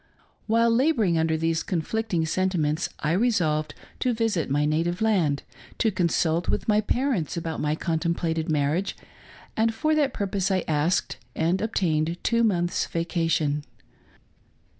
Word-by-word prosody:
While 230 +1 +3
laboring 230 - +2
under 160 0 +1
these 165 0 0
conflicting 185 0 -1
sentiments, 165 -2 0
I 155 - 0
re 215 +8 +3
solved 155 -8 0 0.2
to 250 - +1
visit 220 -10 0
my 145 +2 +1
native 165 +4 0
land, 180 -10 +1 0.3
to 220 - +2
consult 170 -2 +1
with - - -1
my 210 -1 +3
parents 225 - -1
about 165 -1 -3
my 150 0 0
contemplated 165 -1 -1
marriage; 155 +5 0 0.6
and 225 +1 +2
for 310 +7 +1
that 295 -3 +2
purpose 200 -2 -1
I 190 -2 +1
asked 155 +5 0 0.2
and 170 +4 +1
obtained 170 -6 0
two 235 0 +2
months' 175 -5 +1
vacation. 165 -3 0
175 Hz, 140 wpm, -25 LUFS, 160-215 Hz, 0.6 s, While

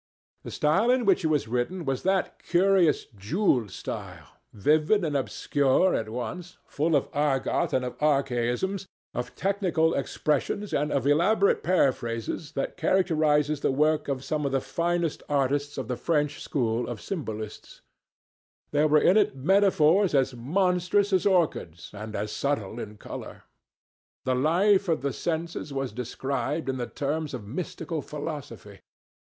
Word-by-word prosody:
The - - -8
style 185 +11 +2
in 250 -1 +3
which 195 -3 +3
it - - +2
was 150 -7 +1
written 125 +10 -2
was 135 -2 -1
that 190 0 0
curious 180 -3 +3
jewelled 115 - +1
style, - - -7 0.2
vivid 155 - +2
and 150 -2 -2
obscure 140 +5 +2
at 110 -1 -1
once, 125 +11 -6
full 155 +2 0
of 140 - +1
argot 145 -2 +1
and 130 -1 0
of 125 - -7
archaisms, 140 +6 0 0.3
of 125 +1 -5
technical 185 -5 +1
expressions 150 +8 -1
and 150 +1 0
of 135 -2 0
elaborate 190 +8 +3
paraphrases, 130 -4 0
that 135 - -3
characterizes 155 -5 +2
the - - +2
work 150 +3 +2
of 135 -2 -2
some 150 +1 -2
of 140 - -1
the 135 - +2
finest 170 +5 -1
artists 145 +1 0
of 130 -4 -4
the 125 -1 -3
French 150 -1 0
school 120 -3 -1
of 120 - -4
Symbolistes. 110 - -6 0.9
There 150 +1 +3
were 150 0 +5
in 190 - +5
it 205 -10 +3
metaphors 185 +2 +3
as 135 -1 +2
monstrous 180 +8 +1
as 190 +2 +3
orchids 160 - 0
and 105 +1 -7
as 105 +1 -3
subtle 120 -6 -2
in 105 -2 -7
colour. - - -9 0.8
The 130 - +2
life 180 +9 +3
of 160 -5 0
the 140 -2 -1
senses 165 -1 -3
was 135 -3 -3
described 135 +4 -3
in 130 - -1
the 120 -1 -3
terms 150 0 -3
of 110 -5 -8
mystical 160 - -4
philosophy. 140 - -7
150 Hz, 150 wpm, -27 LUFS, 130-175 Hz, 0.9 s, were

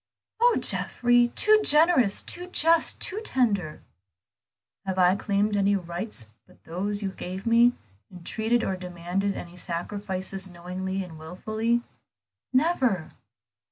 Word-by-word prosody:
"Oh, 480 +1 +4
Geoffrey, 245 0 +3
too 430 0 +5
generous, 300 - +4
too 355 +1 -3
just, 330 -2 +2
too 405 - -2
tender!" 205 - 0 1.0
"Have 190 -1 -3
I 180 0 +5
claimed 205 +1 0
any 200 0 +2
rights 175 - -5 0.2
but - - -23
those 200 +5 -3
you 195 - -2
gave 185 +1 -7
me, 235 +1 +5 0.4
entreated 220 +6 -1
or 190 - -1
demanded 180 +2 -3
any 175 0 -8
sacrifices 190 +2 -4
knowingly 185 +2 -5
and 165 -3 -11
wilfully?" 215 +8 -2 0.7
"Never." 255 - +1
200 Hz, 120 wpm, -26 LUFS, 180-240 Hz, 1.0 s, too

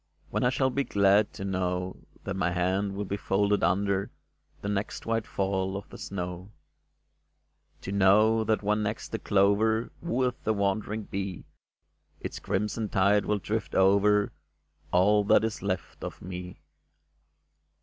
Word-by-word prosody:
When - - 0
I 125 - +4
shall 130 +1 +1
be 140 +2 0
glad 100 -2 +3
to 95 - -6
know 90 -1 -2 0.3
That 100 - -3
my 95 -2 +1
hands 95 +3 0
will 100 +1 -3
be 100 +1 -3
folded 100 +1 +1
under 100 +2 +1 0.5
The - - -3
next 105 +1 -3
white 115 -1 -1
fall 95 0 -1
of 100 - -9
the - - -10
snow? 90 0 -5 1.3
To 95 - -5
know 105 +3 +4
that 110 0 0
when 105 +1 +1
next 105 +1 -3
the 110 - -3
clover 105 +3 +2
Wooeth 130 -7 -1
the 110 - +1
wandering 105 +2 -1
bee, 95 -2 -5 0.7
Its - - -6
crimson 105 +2 -2
tide 100 +2 +3
will 105 - +1
drift 110 +3 -3
over 100 +2 +4 0.6
All 105 +4 +4
that 105 - +5
is 110 -1 -2
left 95 -2 -4
of - - -6
me 90 0 -7
100 Hz, 150 wpm, -28 LUFS, 95-105 Hz, 1.3 s, that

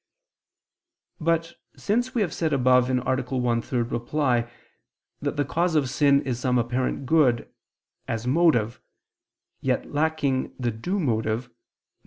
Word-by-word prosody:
But 165 0 0 0.2
since 245 +5 -1
we 235 - +2
have 180 -5 0
said 160 -4 -1
above 125 -1 +4
(A. - - 0
1, 125 -1 0
ad - - -6
3) 125 -2 -1
that 120 0 0 0.9
the 145 - +1
cause 170 +4 0
of 135 -5 +1
sin 140 0 +3
is 125 -3 -3
some 125 -1 +1
apparent 125 +3 -1
good 130 -5 +2 0.5
as 115 0 -3
motive, 125 -6 +2 0.8
yet - - -1
lacking 145 -3 0
the 120 -2 -1
due 175 - -3
motive, 110 - 0
viz. - - -37
130 Hz, 135 wpm, -25 LUFS, 120-160 Hz, 0.9 s, above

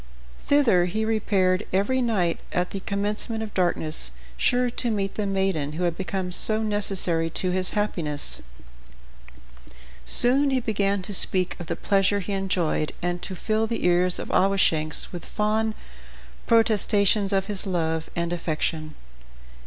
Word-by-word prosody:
Thither 240 -12 +3
he 215 +5 -2
repaired 200 -3 0
every 205 +8 0
night 195 -8 0
at 180 0 -2
the 195 - -4
commencement 210 +3 -3
of 215 - -8
darkness, 155 - -1 0.2
sure 245 - +1
to 240 0 -3
meet 200 -3 -2
the 210 -2 -3
maiden 190 -7 -1
who 175 +4 -4
had 170 -2 0
become 190 -1 -4
so 215 +4 +2
necessary 195 -6 +2
to 180 +3 -1
his 185 0 -1
happiness. 160 -8 -1 1.6
Soon 270 +4 +7
he 265 -1 +1
began 200 -4 -1
to 205 - -6
speak 185 -1 +5
of 175 - -8
the - - -3
pleasure 200 0 +1
he 200 +1 -5
enjoyed, 185 -5 -1
and 175 0 -2
to 190 - -5
fill 220 +4 -1
the 230 -4 -4
ears 180 0 +2
of - - -6
Awashanks 165 -5 +1
with 175 -2 -8
fond 215 +1 -1 0.7
protestations 210 -3 +2
of 195 -1 0
his 205 -1 -3
love 160 -3 -2
and 170 0 -2
affection. 155 -2 -3
195 Hz, 145 wpm, -24 LUFS, 175-215 Hz, 1.6 s, Soon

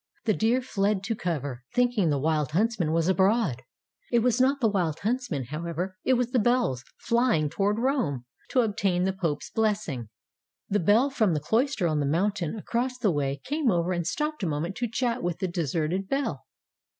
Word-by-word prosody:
The 215 - +3
deer 235 +5 +1
fled 200 -4 0
to 225 +3 -1
cover, 145 - -3
think 245 0 +3
ing 190 -7 +2
the 145 - +1
Wild 150 0 0
Huntsman 205 -4 +1
was 165 0 +1
abroad. 190 - +2 0.5
It 235 -2 +3
was 250 0 +2
not 275 +2 +3
the 235 - +3
Wild 180 -7 0
Huntsman, 220 - -1
however; 170 +4 -3
it 260 - +3
was 245 0 0
the 250 - +3
bells 235 - +1
flying 230 - +1
toward 205 +1 +1
Rome, 230 - 0 0.2
to 255 - +3
obtain 200 -5 0
the 190 +1 +1
Pope's 165 -6 -3
blessing. 205 - -1 0.6
The 205 - +1
bell 225 - +3
from 215 -10 +2
the - - +1
cloister 225 - +1
on 155 -2 0
the 145 - 0
mountain 180 +3 0
across 240 +4 -2
the 215 -6 +2
way 140 -2 -1
came 295 -2 0
over 175 -2 +1
and 175 -1 -2
stopped 300 - -2
a 185 - 0
moment 160 +6 -2
to 240 -1 -1
chat 240 +1 -1
with 175 -1 -2
the 190 - -2
deserted 170 +2 -2
bell. 260 - -2
195 Hz, 190 wpm, -27 LUFS, 160-235 Hz, 0.6 s, The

